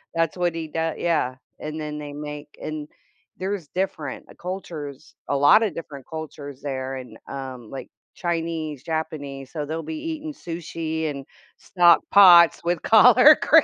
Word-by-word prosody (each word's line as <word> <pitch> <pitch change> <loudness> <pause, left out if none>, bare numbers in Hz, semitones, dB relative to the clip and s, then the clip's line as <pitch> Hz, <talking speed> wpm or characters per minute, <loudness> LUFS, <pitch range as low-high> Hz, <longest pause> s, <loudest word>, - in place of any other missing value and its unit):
that's 165 0 +1
what 175 -2 0
he 160 -1 -4
doe 160 +1 -2
yeah, 155 -7 0 0.2
and 155 +1 -5
then 150 0 -5
they 145 -1 -7
make 150 0 -7
and 155 -1 -5 0.5
there's 190 -4 -3
different 160 -5 -4
cultures, 155 -6 -7 0.2
a 140 - +1
lotta 210 +10 +5
different 145 -5 -9
cultures 145 -4 -8
there 135 -1 -4
and, 125 -2 -9
um, 130 -4 -7
like, 135 - -8 0.3
Chinese, 165 -4 -3
Japanese, 145 -4 -5
so 150 -3 -4
they'll 160 +2 -4
be 320 - -5
eating 310 -1 -5
sushi 165 - -4
and 140 -2 -6 0.3
stock 175 -2 +4
pots 175 -4 +8
with 170 -1 0
collard 250 +6 +7
green. 320 0 +6
160 Hz, 150 wpm, -24 LUFS, 145-175 Hz, 0.5 s, pots